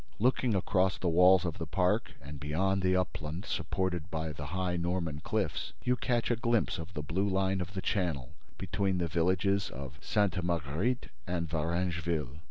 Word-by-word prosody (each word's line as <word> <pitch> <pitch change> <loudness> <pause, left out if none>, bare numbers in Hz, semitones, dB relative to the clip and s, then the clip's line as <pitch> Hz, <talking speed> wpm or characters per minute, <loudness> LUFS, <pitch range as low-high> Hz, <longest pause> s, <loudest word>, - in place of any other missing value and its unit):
Looking 125 -1 +2
across 95 0 +2
the 90 - -2
walls 90 +2 +6
of 85 0 -3
the 80 - -3
park 90 +1 +1
and 70 0 -8
beyond 95 +7 +1
the 95 0 +3
upland 85 0 -2
supported 90 -3 -2
by 80 -1 -2
the 75 0 -6
high 90 +2 -1
Norman 85 -3 -1
cliffs, - - -2
you 125 - +3
catch 120 -1 0
a - - +3
glimpse 115 -4 +1
of 80 +3 -8
the 75 - -3
blue 95 +7 0
line 95 0 +1
of 90 +3 -6
the 95 - -3
Channel 85 - -1 0.2
between 95 -2 0
the 85 -1 0
villages 95 +4 +1
of 70 +1 -8
Sainte 100 -4 +1
Marguerite 85 - 0 0.2
and 85 -2 -1
Varengeville. 80 -3 -1
90 Hz, 175 wpm, -31 LUFS, 80-95 Hz, 0.2 s, walls